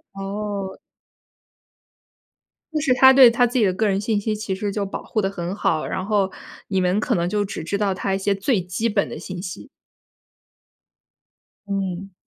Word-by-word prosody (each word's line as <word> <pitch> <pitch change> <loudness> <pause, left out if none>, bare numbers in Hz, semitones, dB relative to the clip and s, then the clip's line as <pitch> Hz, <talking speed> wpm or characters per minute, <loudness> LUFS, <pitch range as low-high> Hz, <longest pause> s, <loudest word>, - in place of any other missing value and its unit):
哦。 195 0 -4 2.0
就 305 - 0
是 280 -4 +1
他 265 +1 +8
对 260 -3 +9
他 245 +1 +3
自 245 +1 0
己 215 - +4
的 185 - +3
个 215 +3 +1
人 195 0 +1
信 215 -1 0
息 215 +1 -1
其 210 -3 -3
实 205 +1 -3
就 205 0 -2
保 195 - -5
护 215 - -1
得 195 - 0
很 180 0 -4
好， 160 -6 0
然 190 - -3
后 200 -2 +1 0.4
你 190 -2 +1
们 180 +3 +2
可 - - 0
能 175 0 0
就 205 0 0
只 195 - -6
知 200 +5 -2
道 200 -2 +1
他 195 +1 -1
一 - - 0
些 200 +1 +1
最 200 +3 +1
基 185 +6 -1
本 205 -2 +1
的 - - -7
信 185 -1 -6
息。 180 - -7 2.0
嗯。 195 -1 -3
200 Hz, 200 characters per minute, -22 LUFS, 190-215 Hz, 2.0 s, 对